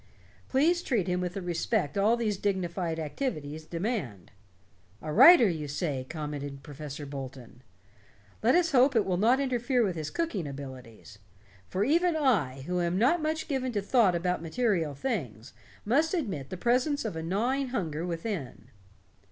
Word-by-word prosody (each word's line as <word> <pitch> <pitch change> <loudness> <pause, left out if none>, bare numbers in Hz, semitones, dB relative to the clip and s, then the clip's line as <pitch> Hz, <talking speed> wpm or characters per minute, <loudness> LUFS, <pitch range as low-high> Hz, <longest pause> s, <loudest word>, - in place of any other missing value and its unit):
Please 330 +6 +3
treat 230 - 0
him 180 0 0
with 180 0 -3
the 195 - -4
respect 175 -1 -1
all 210 +4 +3
these 220 -3 0
dignified 180 -4 -2
activities 155 - -4
demand." 165 - -4 0.7
"A 155 -1 -5
writer, 265 - +9
you 160 -5 -3
say," 140 -3 -3
commented 145 -3 -5
Professor 145 0 -7
Bolton. 130 -3 -8 0.8
"Let 235 +6 +4
us 345 -2 +3
hope 260 0 +4
it 220 - +3
will 185 -2 0
not 235 +7 +3
interfere 250 -2 +1
with 190 -5 -1
his 155 -2 -4
cooking 230 - -2
abilities. 130 -6 -10 0.5
For 190 - 0
even 335 +7 +2
I, 175 - +1
who 180 +1 -1
am 170 +1 0
not 275 - +3
much 315 +1 -2
given 260 -4 -1
to 205 - 0
thought 205 -4 +3
about 180 0 -1
material 170 - 0
things, 135 - -4 0.3
must 305 - +2
admit 190 - -3
the 185 - -5
presence 250 - +1
of 210 - -3
a 160 - -3
gnawing 240 +11 0
hunger 170 - -3
within." 165 - -5
185 Hz, 160 wpm, -28 LUFS, 150-250 Hz, 0.8 s, writer